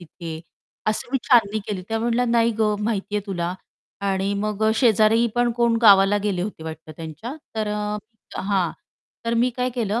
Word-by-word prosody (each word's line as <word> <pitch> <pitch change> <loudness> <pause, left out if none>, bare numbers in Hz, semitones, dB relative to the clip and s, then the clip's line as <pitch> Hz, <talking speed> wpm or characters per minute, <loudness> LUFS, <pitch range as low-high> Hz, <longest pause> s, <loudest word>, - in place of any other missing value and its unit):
तिथे." 165 -1 -8 0.5
असं 215 - -2
मी 270 - +2
छाननी 220 -4 +4
केली 195 -4 -3
त्या 225 0 -1
म्हटल्या 235 +2 +1
नाही 235 0 +3
गं, 210 -1 +2
माहिती 210 -2 -1
आहे 205 0 -3
तुला 175 -2 -2 0.5
आणि 195 +1 0
मग 210 +1 -2
अ, 220 - +4
शेजारी 225 -1 +4
पण 240 0 +2
कोण 235 0 +2
गावाला 200 -1 +7
गेले 190 -4 0
होते 195 -4 -5
वाटतं 160 0 -8
त्यांच्या, 165 - -7 0.2
तर 215 -1 -1
अ, 210 0 -2 0.4
हां, 190 -3 +1 0.6
तर 230 - +1
मी 235 +2 +3
काय 250 0 0
केलं 225 -2 0
210 Hz, 180 wpm, -23 LUFS, 195-230 Hz, 0.6 s, गावाला